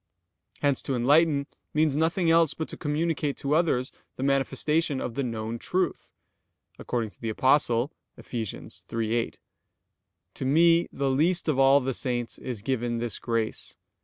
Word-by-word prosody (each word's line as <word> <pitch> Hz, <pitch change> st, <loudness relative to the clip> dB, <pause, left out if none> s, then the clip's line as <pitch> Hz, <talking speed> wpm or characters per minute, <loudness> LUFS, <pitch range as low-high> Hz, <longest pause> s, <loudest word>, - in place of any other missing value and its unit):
Hence 140 Hz, -2 st, +2 dB
to 135 Hz, -, -2 dB
enlighten 140 Hz, +3 st, +3 dB, 0.3 s
means 155 Hz, -2 st, +3 dB
nothing 165 Hz, +2 st, +2 dB
else 165 Hz, -2 st, +4 dB
but 160 Hz, -, -4 dB
to -, -, -6 dB
communicate 150 Hz, -1 st, -1 dB
to 140 Hz, +1 st, -1 dB
others 150 Hz, -6 st, +1 dB, 0.2 s
the 130 Hz, -, -4 dB
manifestation 140 Hz, +2 st, +1 dB
of 125 Hz, -, -4 dB
the 140 Hz, -, -2 dB
known 115 Hz, -2 st, -3 dB
truth; 180 Hz, +5 st, -2 dB, 0.7 s
according 115 Hz, -4 st, -2 dB
to -, -, -22 dB
the 115 Hz, -, -2 dB
Apostle 130 Hz, +2 st, +2 dB, 0.3 s
(Eph. -, -, -15 dB
3:8): 115 Hz, 0 st, -3 dB, 1.0 s
"To -, -, -5 dB
me 165 Hz, +4 st, +4 dB
the 135 Hz, -1 st, -1 dB
least 170 Hz, +7 st, +2 dB
of 145 Hz, -4 st, +1 dB
all 135 Hz, +1 st, +6 dB
the 130 Hz, +1 st, -2 dB
saints 120 Hz, -2 st, -2 dB
is 120 Hz, -6 st, -5 dB
given 120 Hz, -1 st, -1 dB
this 115 Hz, -3 st, -2 dB
grace 115 Hz, -2 st, -2 dB
135 Hz, 150 wpm, -27 LUFS, 120-155 Hz, 1.0 s, all